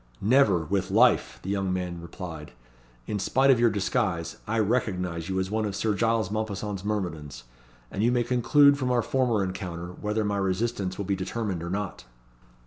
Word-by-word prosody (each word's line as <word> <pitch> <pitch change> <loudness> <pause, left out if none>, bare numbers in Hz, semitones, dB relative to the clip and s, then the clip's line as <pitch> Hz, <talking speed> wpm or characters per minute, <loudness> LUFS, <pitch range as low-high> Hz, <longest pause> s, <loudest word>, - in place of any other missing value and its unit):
"Never, 105 - +3
with 95 +3 -1
life," - - +3
the 95 - -3
young 95 -2 -1
man 90 -2 -3
replied. 85 -3 -8 0.5
"In 105 - -3
spite 135 +7 +3
of 125 - +4
your 120 0 +5
disguise, 95 -2 -1
I 115 +2 -1
recognise 95 -7 -1
you 95 0 0
as 95 +1 -2
one 110 0 0
of 100 -2 -2
Sir 110 +1 0
Giles 110 -1 +1
Mompesson's 105 -2 -3
myrmidons; 80 - -4 0.5
and 100 - -3
you 120 +3 +3
may 120 -1 +2
conclude 140 +4 +4
from 130 -2 -1
our 120 -2 +2
former 125 -6 +1
encounter, 90 -2 -5
whether 105 +4 -2
my 100 0 0
resistance 95 0 -1
will 100 - -3
be 100 +1 0
determined 95 -1 -3
or 85 - -5
not." 95 -8 -4
100 Hz, 180 wpm, -27 LUFS, 90-110 Hz, 0.5 s, your